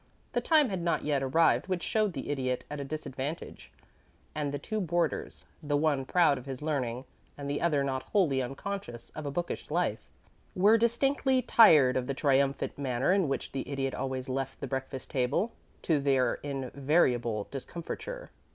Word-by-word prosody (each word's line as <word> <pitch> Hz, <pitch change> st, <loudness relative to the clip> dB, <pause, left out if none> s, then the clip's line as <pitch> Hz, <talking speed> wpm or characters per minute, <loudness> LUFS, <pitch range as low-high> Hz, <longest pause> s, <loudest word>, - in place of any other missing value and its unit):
The -, -, +1 dB
time 305 Hz, -5 st, +4 dB
had 190 Hz, -3 st, -2 dB
not 170 Hz, 0 st, 0 dB
yet 145 Hz, -2 st, +1 dB
arrived 150 Hz, +8 st, +3 dB
which 185 Hz, -2 st, -2 dB
showed 215 Hz, -3 st, +1 dB
the 140 Hz, -1 st, -4 dB
Idiot 130 Hz, -3 st, -2 dB
at 150 Hz, -, -4 dB
a -, -, -3 dB
disadvantage; 145 Hz, +1 st, -6 dB, 0.6 s
and 150 Hz, -2 st, -2 dB
the 145 Hz, -, -2 dB
two 215 Hz, +9 st, -3 dB
boarders, 170 Hz, -2 st, -1 dB, 0.2 s
the 145 Hz, -2 st, 0 dB
one 145 Hz, -3 st, +1 dB
proud 160 Hz, -3 st, +3 dB
of 125 Hz, -, -13 dB
his 135 Hz, +1 st, -6 dB
learning, 130 Hz, -5 st, -2 dB, 0.3 s
and 140 Hz, -1 st, -6 dB
the 145 Hz, +1 st, -2 dB
other 150 Hz, -5 st, +2 dB
not 130 Hz, -1 st, -1 dB
wholly 160 Hz, -11 st, +2 dB
unconscious 135 Hz, -1 st, -6 dB
of 155 Hz, -2 st, -6 dB
a -, -, -2 dB
bookish 175 Hz, +4 st, -4 dB
life, -, -, -1 dB, 0.5 s
were 205 Hz, +4 st, +6 dB
distinctly 260 Hz, +3 st, +2 dB
tired 155 Hz, -, +6 dB
of 125 Hz, -1 st, -2 dB
the 140 Hz, -, -2 dB
triumphant 140 Hz, 0 st, +1 dB
manner 135 Hz, +4 st, +1 dB
in 190 Hz, -4 st, +2 dB
which 135 Hz, -, -3 dB
the 135 Hz, 0 st, -4 dB
Idiot 135 Hz, -1 st, -2 dB
always 130 Hz, -1 st, -3 dB
left 135 Hz, 0 st, -3 dB
the -, -, -4 dB
breakfast 135 Hz, 0 st, -5 dB
table 135 Hz, -, 0 dB, 0.3 s
to 160 Hz, -4 st, +2 dB
their 135 Hz, -2 st, +2 dB
invariable 130 Hz, -5 st, 0 dB
discomfiture. 175 Hz, -, -6 dB
140 Hz, 170 wpm, -30 LUFS, 135-175 Hz, 0.6 s, were